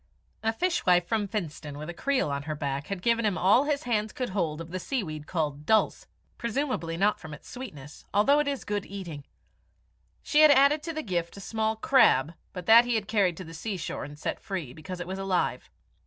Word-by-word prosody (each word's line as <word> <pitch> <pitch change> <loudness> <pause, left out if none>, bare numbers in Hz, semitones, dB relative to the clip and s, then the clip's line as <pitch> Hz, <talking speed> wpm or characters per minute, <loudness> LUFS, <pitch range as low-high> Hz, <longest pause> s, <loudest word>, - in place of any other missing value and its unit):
A 225 - +1
fishwife 225 - +2
from 215 0 0
Finstone 155 -8 -5
with 150 +1 -6
a 175 - -5
creel 265 - 0
on 140 0 -2
her 155 - -1
back, 140 -1 -3
had 195 -3 -5
given 230 0 +2
him 205 -4 +1
all 210 +9 +4
his 290 -1 0
hands 220 -3 0
could 255 - -3
hold 165 -6 -1
of 165 0 -8
the 185 - -3
sea 255 +4 -2
weed 155 -3 -7
called 150 -4 -2
dulse, 220 -1 +2 0.3
presumably 235 - -2
not 205 +3 +2
from 160 -3 -8
its - - -16
sweetness, 150 - -9
although 275 +9 +4
it 295 - +1
is 280 -2 -2
good 205 -1 -3
eating. 170 -8 -7 1.0
She 300 - +4
had 310 - +9
added 285 +2 +5
to 330 +2 -5
the 310 0 -4
gift 175 -2 -2
a - - -7
small 220 +2 -1
crab, 215 - +4 0.2
but 180 -2 -7
that 230 +3 +8
he 240 -1 0
had 210 -2 -1
carried 195 -6 +2
to 185 - -6
the 165 -1 -10
seashore 185 +2 -4
and 145 +1 -9
set 150 - -3
free, 170 -10 -5
because 160 +5 -8
it 175 - -4
was 190 +2 -5
alive. 195 -2 -1
195 Hz, 215 wpm, -28 LUFS, 165-235 Hz, 1.0 s, had